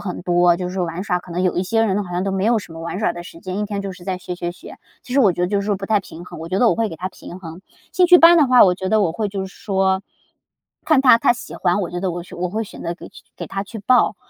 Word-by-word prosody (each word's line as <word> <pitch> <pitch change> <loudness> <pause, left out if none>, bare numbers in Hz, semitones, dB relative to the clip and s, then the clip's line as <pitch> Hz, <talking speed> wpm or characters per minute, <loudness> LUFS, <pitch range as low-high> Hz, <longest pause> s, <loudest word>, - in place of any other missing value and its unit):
很 180 -3 -6
多， 175 -1 +3
就 180 0 -4
是 180 - -7
说 185 -2 -1
玩 170 +2 -5
耍， 180 -3 0
可 180 - -15
能 180 +2 -1
有 185 - 0
一 180 - +1
些 225 +4 +1
人 205 -1 0
好 180 - -9
像 180 +2 -1
都 195 - -1
没 190 0 -1
有 230 +1 +3
什 180 -5 -10
么 165 - -9
玩 170 +3 -5
耍 175 - +1
的 175 - -8
时 175 - -12
间， 185 +1 -5
一 210 - -1
天 205 -1 -4
就 195 -1 -5
是 180 -1 -14
在 185 -1 -3
学， 180 0 -6
学， 175 0 -4
学， 180 - -13 0.2
其 250 - -9
实 275 - +4
我 205 -8 +4
觉 175 +1 -3
得 - - +2
就 200 0 0
是 200 - -5
说 205 -1 0
不 195 - -7
太 215 -1 +2
平 175 -2 -11
衡， - - -10
我 165 - -7
觉 185 - -1
得 240 - +4
我 - - +2
会 225 -1 0
给 165 - -8
他 185 +3 -4
平 180 -1 -11
衡。 165 -1 -10 0.3
兴 365 - +4
趣 355 0 +8
班 340 +1 +8
的 295 - +5
话， 250 -1 +7
我 180 -2 +3
觉 190 +1 -4
得 215 +2 +3
我 165 -4 0
会 210 +4 -2
就 195 -1 -4
是 190 - -14
说， 190 -1 0 0.8
看 310 -4 +4
他 255 -3 +7
他 - - +3
喜 240 - -9
欢， 180 +2 +1
我 180 - -3
觉 175 0 -4
得 190 -1 -1
我 175 - -5
选 175 - -12
我 180 +1 -1
会 220 +4 -2
选 - - -11
择 170 - -3
给 - - -12 0.3
给 - - -6
他 195 0 -4
去 220 +3 -9
报， 250 +5 +3
190 Hz, 360 characters per minute, -20 LUFS, 175-210 Hz, 0.8 s, 趣